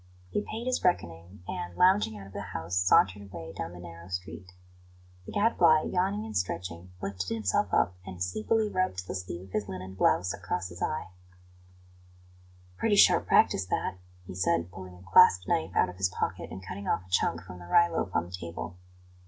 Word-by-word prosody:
He - - 0
paid 220 +3 -6
his 255 0 0
reckoning, 85 - -1
and, 90 0 -5
lounging 180 - +4
out 100 - -9
of 95 - -14
the - - -4
house, 80 -2 -5
sauntered 95 +2 +4
away 80 -2 -8
down - - -5
the 90 - -11
narrow 85 0 -10
street. 90 0 -6 0.8
The - - -6
Gadfly, 175 -7 +4
yawning 195 +4 0
and 110 - -7
stretching, 90 -1 -3
lifted 95 -1 -3
himself 105 -5 0
up 90 - +3
and 95 -2 -9
sleepily 105 - 0
rubbed 185 - -1
the - - -4
sleeve 90 -1 -5
of - - -19
his 105 -1 -1
linen 95 0 -6
blouse 90 -1 +2
across 90 +1 -3
his 85 -1 -11
eyes. 155 - -1 1.7
"Pretty 215 -2 +2
sharp - - +6
practice 95 - +4
that," 90 0 -2 0.3
he 90 - -8
said, 85 -1 0
pulling 95 -1 -10
a 90 - -15
clasp 90 0 +7
knife 80 +3 0
out - - +4
of 90 - -10
his 95 -1 +1
pocket - - -3
and 95 - -9
cutting 100 +2 -6
off 95 - 0
a - - -20
chunk 85 -2 +1
from 90 0 -10
the 85 - -11
rye 170 - +5
loaf 165 - -2
on - - +2
the 90 - -13
table. 90 0 -6
90 Hz, 195 wpm, -29 LUFS, 90-105 Hz, 1.7 s, clasp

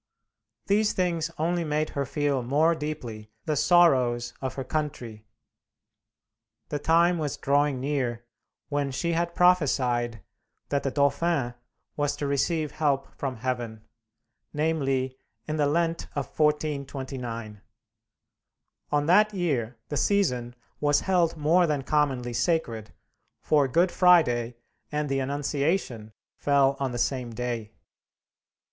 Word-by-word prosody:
These 210 +1 +2
things 170 -3 0
only 170 +2 0
made 155 0 -1
her 140 -1 -2
feel 145 -2 0
more 145 +7 +3
deeply 130 -9 -6 0.2
the 155 - 0
sorrows 130 -8 +3
of 130 -1 -3
her 135 - -3
country. 125 -8 -4 1.4
The 145 - -2
time 170 +3 +3
was 150 -3 -2
drawing 140 -1 +1
near 125 -4 -2 0.4
when 145 -1 -1
she 170 +6 -1
had 170 +1 -1
prophesied 125 - +2 0.5
that 140 -1 +1
the 140 - -1
Dauphin 140 -1 +1 0.4
was 145 -1 0
to 145 - -4
receive 150 +2 0
help 140 -3 -1
from 135 -2 -3
heaven 120 -2 -4 0.7
namely, 135 -4 0 0.3
in 155 0 -2
the 145 -1 +2
Lent 165 +2 0
of 140 -2 -1
1429. 135 -7 -2 1.3
On 145 0 +2
that 210 +5 +4
year 130 - -1
the 145 - -2
season 125 -13 +1 0.2
was 145 0 +3
held 175 -4 +1
more 165 +4 +3
than 145 -3 -1
commonly 130 -5 0
sacred, 115 -7 -1 0.5
for 145 -3 +2
Good 170 +7 +2
Friday 125 -10 +4 0.4
and 150 -1 -1
the 135 0 0
Annunciation 140 - -1 0.3
fell 140 -1 +3
on 135 -2 -1
the 120 - -4
same 120 -2 -2
day. 120 -3 -4
145 Hz, 125 wpm, -26 LUFS, 125-160 Hz, 1.4 s, that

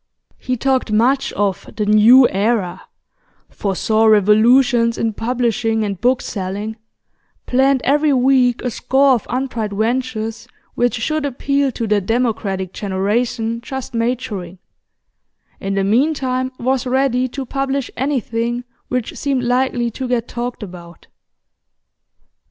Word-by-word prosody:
He 255 -1 -2
talked 260 -2 0
much 250 +6 +2
of 200 -2 -2
'the 210 - -1
new 225 +5 +7
era,' 200 -2 -1 0.7
foresaw 215 +3 0
revolutions 230 +3 +4
in 225 -1 -1
publishing 230 -1 0
and 200 -3 -4
book 250 +1 +2
selling, 205 +3 -4 0.7
planned 265 +1 +2
every 295 +2 +2
week 255 -2 +3
a 250 - -1
score 270 +3 +3
of 235 - -2
untried 245 -5 -2
ventures 225 0 -2 0.3
which 245 0 +1
should 310 +7 -1
appeal 280 0 0
to 230 - -3
the 210 -1 +1
democratic 205 -4 -1
generation 225 +4 -1
just 265 +1 -6
maturing; 230 -6 -3 1.0
in 195 0 -3
the 195 - +1
meantime, 255 +3 +1
was 260 +1 -1
ready 255 -1 +1
to 265 +2 -6
publish 275 0 -2
anything 240 -3 -2 0.2
which 250 -2 -3
seemed 270 -3 -1
likely 245 -1 0
to 260 +3 -5
get 245 -2 -1
talked 240 -1 -5
about. 175 -3 -11
240 Hz, 125 wpm, -18 LUFS, 215-260 Hz, 1.0 s, new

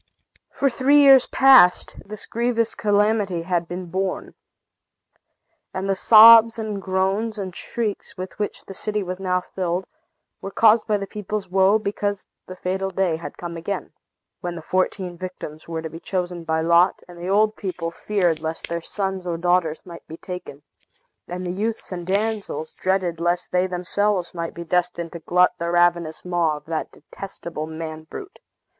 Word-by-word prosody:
For 275 - 0
three 265 +3 +3
years 270 -3 +7
past, 260 -10 +5
this 215 +1 -7
grievous 230 -1 0
calamity 205 -4 +1
had 175 -1 -1
been 180 +2 -5
borne. 190 +1 -3 1.4
And 190 +1 -2
the 195 - +1
sobs, 225 +3 +8
and 215 -3 -4
groans, 195 +4 -1
and 190 -3 -5
shrieks, 220 -4 -4
with 185 +2 -7
which 205 - -3
the 195 - -9
city 210 +1 -2
was 185 0 -5
now 180 -1 0
filled, 180 0 -3 0.6
were 195 - -5
caused 225 +3 +4
by 210 -2 +2
the 200 - -4
people's 210 -1 -5
woe, 190 +3 +4
because 205 -1 -3 0.2
the 185 - -8
fatal 190 +1 -2
day 185 -3 0
had 165 - -9
come 170 -1 -6
again, 180 +3 -5 0.5
when 175 -1 -5
the 165 - -8
fourteen 185 -1 -1
victims 180 -4 -8
were 165 -1 -4
to - - -3
be 165 - -8
chosen 175 -2 -3
by 160 0 0
lot; 170 +2 +3
and 175 -1 -13
the 175 +2 -5
old 215 +2 +3
people 175 -4 -4
feared 175 -3 0
lest 160 +1 -4
their 170 0 -3
sons 190 0 -3
or 170 -1 -2
daughters 175 -2 0
might 170 -2 -11
be 160 - -9
taken, 180 -6 -8 0.6
and 180 +1 -5
the 175 - -2
youths 215 +4 -3
and 175 -1 -6
damsels 200 -6 -2
dreaded 185 -3 -1
lest 175 +1 -1
they 180 +1 +2
themselves 185 +1 -1
might 170 -1 -5
be 170 - -6
destined 170 -1 -1
to 170 - -7
glut 180 +3 +3
the 170 0 -2
ravenous 175 -2 +1
maw 170 -4 +1
of - - -14
that 160 -1 -4
detestable 170 -2 -8
man 160 0 -7
brute. 390 -1 -9
185 Hz, 170 wpm, -22 LUFS, 170-205 Hz, 1.4 s, sobs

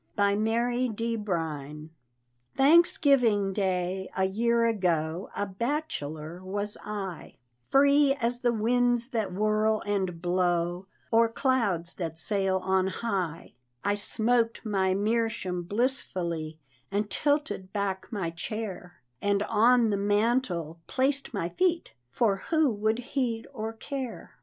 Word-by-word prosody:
BY 200 -1 +3
MARY 240 +4 +1
D. 230 +1 -2
BRINE. 160 -7 -4 0.7
Thanksgiving 270 - +4
day, 190 -1 -1
a 190 - +2
year 230 +4 +2
ago, 175 -5 0
A 205 - -1
bachelor 185 - -4
was 205 +2 -2
I, 195 -5 -6 0.3
Free 280 0 +5
as 240 +1 0
the 245 -1 +2
winds 240 +2 +2
that 220 -7 -2
whirl 215 +2 +1
and 190 -4 -1
blow, 175 0 0 0.2
Or 230 0 +5
clouds 225 -10 0
that 165 -3 -5
sail 195 +1 +1
on 190 0 +2
high: 190 -6 -3 0.3
I 205 - +2
smoked 230 +3 0
my 190 -3 +1
meerschaum 210 -4 -1
blissfully, 175 - -1 0.3
And 205 +1 -1
tilted 285 -4 0
back 195 -2 -2
my 190 -7 -2
chair, 180 - -6 0.2
And 200 0 +1
on 230 +2 +4
the 200 - +1
mantel 205 -5 0
placed 275 +1 0
my 195 -7 -2
feet, 350 - 0 0.2
For 200 - +1
who 315 -5 +3
would 215 +1 0 0.2
heed 240 -5 -1
or 220 +1 -4
care? 255 +2 -7
205 Hz, 125 wpm, -28 LUFS, 185-235 Hz, 0.7 s, Free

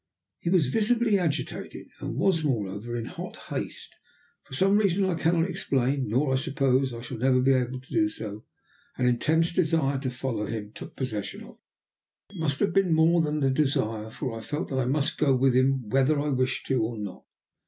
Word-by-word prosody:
He 170 - -2
was 175 -4 +4
visibly 225 - +2
agitated, 165 -5 -3
and - - -4
was 165 -5 +2
moreover 115 -3 -2
in 115 -1 -3
hot - - -7
haste. - - -6 0.5
For 130 - -7
some 195 +6 +4
reason 200 -2 +2
that 190 - +1
I 170 - -3
cannot 165 +1 +2
explain, 135 -4 0
nor, 130 +5 +1
I - - +3
suppose, 135 -2 +1
shall 125 -3 -6
I - - +4
ever 130 -1 +4
be 135 +1 +4
able 130 0 0
to 130 - -14
do 320 -1 +3
so, 105 - -7 0.5
an 125 - +1
intense 160 +8 +2
desire 155 -6 +1
to 130 -1 -2
follow 125 -4 -3
him 105 -2 -5
took - - -10
possession 110 -6 -4
of - - -12
me. - - -15 0.8
It 195 - -10
must 145 -3 0
have 205 - +2
been 195 -4 +3
more 165 +2 +4
than 150 -1 -1
a 135 - +3
desire, 115 -6 0
for 125 +1 -5
I 115 - -6
felt 145 +7 -4
that 130 - -1
I 130 - +1
must 140 +2 0
go 140 -3 +4
with 130 0 +3
him 130 -1 +2
whether 135 +4 +3
I 150 +1 -1
wished 130 -1 0
to 130 -3 +1
or 110 +1 -2
not. 100 -3 -7
135 Hz, 205 wpm, -27 LUFS, 125-160 Hz, 0.8 s, was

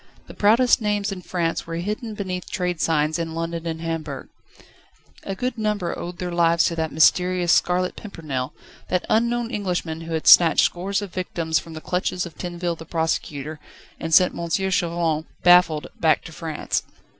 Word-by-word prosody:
The - - -12
proudest 230 +4 +4
names 210 -1 0
in 190 -2 -6
France 170 -2 -2
were 165 - -4
hidden 210 +5 -4
beneath 185 -3 -4
trade 180 -3 -2
signs 155 0 +1
in 165 -1 -4
London 165 0 -3
and 160 0 -4
Hamburg. 160 -4 -4 0.9
A 195 - -5
good 250 +3 -3
number 210 -5 -1
owed 175 0 -6
their 180 0 -4
lives 170 -1 +3
to 170 - 0
that 160 -1 -2
mysterious 180 +2 +3
Scarlet 180 +1 +1
Pimpernel, 150 - -5 0.4
that 180 0 -1
unknown 235 +1 +1
Englishman 180 -6 -2
who 165 0 -6
had 160 - -3
snatched 170 -2 +7
scores 195 +3 -1
of 195 - -8
victims 165 -3 -1
from 165 - -11
the 155 - -7
clutches 180 +1 -1
of 170 - -10
Tinville 175 -1 -3
the - - -7
Prosecutor, 155 -2 -3 0.4
and 165 - -4
sent 180 +3 +5
M. 170 0 -4
Chauvelin, 170 -4 0 0.2
baffled, 175 -4 +5
back 160 -1 +3
to 165 - -10
France. 160 -1 -3
175 Hz, 170 wpm, -23 LUFS, 165-185 Hz, 0.9 s, snatched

